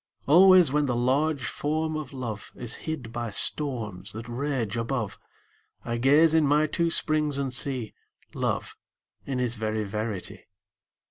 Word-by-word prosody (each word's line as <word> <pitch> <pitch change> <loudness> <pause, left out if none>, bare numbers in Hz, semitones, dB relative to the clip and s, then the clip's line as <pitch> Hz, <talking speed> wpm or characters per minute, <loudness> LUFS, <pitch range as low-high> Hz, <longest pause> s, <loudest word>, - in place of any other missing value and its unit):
Always 180 0 +6
when 150 0 +1
the 125 -3 -1
large 135 +4 +1
Form 155 +1 -2
of 155 -3 -5
Love 120 -6 -6
Is 120 -2 -3 0.2
hid 130 -8 -5
by 120 -1 -3
storms 105 -5 +1
that 110 +1 -8
rage 120 -3 -2
above, 115 -2 -3 0.7
I 120 0 -2
gaze 145 +6 +4
in 160 -2 +4
my 150 +2 +3
two 170 +2 0
springs 155 -3 +1
and 135 -2 -2
see 125 -3 -1 0.4
Love - - -2 0.5
in 135 -2 -2
his 120 -2 0
very 110 0 -2
verity. 105 -1 -5
130 Hz, 145 wpm, -26 LUFS, 115-150 Hz, 0.7 s, Always